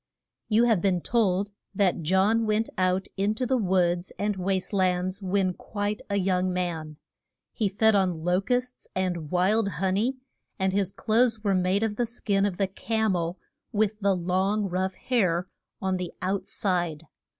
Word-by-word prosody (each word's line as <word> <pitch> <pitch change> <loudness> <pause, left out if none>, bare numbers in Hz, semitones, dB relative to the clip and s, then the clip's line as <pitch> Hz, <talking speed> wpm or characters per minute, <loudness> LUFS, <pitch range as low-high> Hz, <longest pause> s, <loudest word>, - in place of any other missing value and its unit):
YOU 220 +2 +4
have 225 -7 +3
been 185 -2 +2
told 200 -1 +1 0.2
that 185 -3 +2
John 195 +7 +2
went 215 +1 +1
out 185 0 +1
in 200 +2 +1
to 255 - -1
the 260 +2 +1
woods 180 -3 +1
and 205 0 0
waste 190 +1 -1
lands 185 0 +1
when 190 -1 +1
quite 205 +2 -3
a 200 - 0
young 185 -1 +1
man. 165 -4 -3 0.6
He 215 -4 0
fed 220 +3 +3
on 185 -5 +1
lo 180 +2 +2
custs 250 +3 -2
and 175 -5 -1
wild 195 +5 +2
hon 190 +3 0
ey, 240 +6 +1 0.4
and 190 -1 0
his 195 -1 +1
clothes 225 +1 +1
were 200 -2 +2
made 185 +3 +2
of 210 -2 -1
the 240 - 0
skin 205 -4 0
of 185 -3 -4
the 195 - +2
cam 220 +1 -1
el, 170 +1 -2 0.3
with 215 -1 0
the 200 -2 +2
long 190 +4 0
rough 185 +1 -1
hair 180 -8 0 0.4
on 190 -1 +1
the 180 -1 -4
out 190 +2 -2
side. 175 -5 -1
190 Hz, 170 wpm, -26 LUFS, 180-210 Hz, 0.6 s, YOU